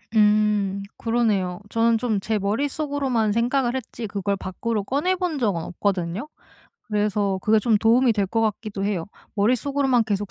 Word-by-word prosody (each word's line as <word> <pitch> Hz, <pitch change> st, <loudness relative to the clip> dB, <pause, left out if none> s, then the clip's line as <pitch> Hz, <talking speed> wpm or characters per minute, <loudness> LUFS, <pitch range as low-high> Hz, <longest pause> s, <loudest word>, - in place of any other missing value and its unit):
음 210 Hz, -2 st, +3 dB, 0.2 s
그러네요. 210 Hz, -6 st, 0 dB
저는 230 Hz, +1 st, +3 dB
좀 225 Hz, -3 st, 0 dB
제 215 Hz, +2 st, -1 dB
머릿속으로만 265 Hz, +1 st, 0 dB
생각을 240 Hz, +3 st, +1 dB
했지 240 Hz, -2 st, -5 dB
그걸 200 Hz, 0 st, -1 dB
밖으로 210 Hz, +4 st, -3 dB
꺼내 290 Hz, -, 0 dB
본 350 Hz, -5 st, -2 dB
적은 200 Hz, -9 st, 0 dB
없거든요. 185 Hz, -, -2 dB, 0.6 s
그래서 205 Hz, -2 st, 0 dB
그게 220 Hz, +1 st, +4 dB
좀 220 Hz, +1 st, +3 dB
도움이 230 Hz, +3 st, +4 dB
될 205 Hz, -2 st, 0 dB
것 225 Hz, +4 st, -1 dB
같기도 210 Hz, -2 st, -2 dB
해요. 195 Hz, -5 st, -1 dB, 0.3 s
머릿속으로만 255 Hz, +3 st, +2 dB
계속 205 Hz, -2 st, -2 dB
215 Hz, 340 characters per minute, -23 LUFS, 200-240 Hz, 0.6 s, 그게